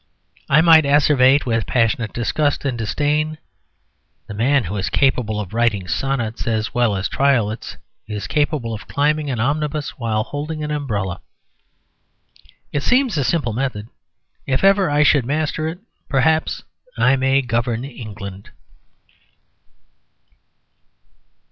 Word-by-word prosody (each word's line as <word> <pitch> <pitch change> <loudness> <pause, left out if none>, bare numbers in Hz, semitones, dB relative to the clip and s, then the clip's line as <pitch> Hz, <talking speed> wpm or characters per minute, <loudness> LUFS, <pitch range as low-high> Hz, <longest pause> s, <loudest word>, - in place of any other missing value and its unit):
I 150 +3 +5
might 160 -1 +7
asseverate 140 -1 +4
with 115 -3 -1
passionate 115 -2 +1
disgust 145 +5 -1
and 135 -3 0
disdain: 150 +7 -1 0.9
"The - - -8
man 130 +5 +2
who 100 +2 -5
is 95 - -2
capable 125 -6 +1
of 105 -1 -6
writing 110 -5 0
sonnets 120 -1 -2
as 110 -1 -1
well 120 -4 +2
as 95 0 -1
triolets 120 -6 0 0.3
is 105 -1 -5
capable 145 -6 -1
of 110 - -8
climbing 150 +1 0
an 125 -4 -2
omnibus 150 +3 -2
while 110 -3 0
holding 150 +4 -5
an 150 - -3
umbrella." 105 -11 -3 1.5
It 145 - -1
seems 255 - +2
a 145 - +1
simple 140 -7 0
method; 115 -3 -3 0.6
if 130 +3 0
ever 195 -1 +4
I 145 0 +3
should 145 -2 +4
master 155 +4 -1
it 165 +2 -4 0.3
perhaps 155 +3 +1 0.3
I 135 - +4
may 135 +1 +2
govern 120 0 -1
England. 105 -6 -9
135 Hz, 130 wpm, -20 LUFS, 115-150 Hz, 1.5 s, might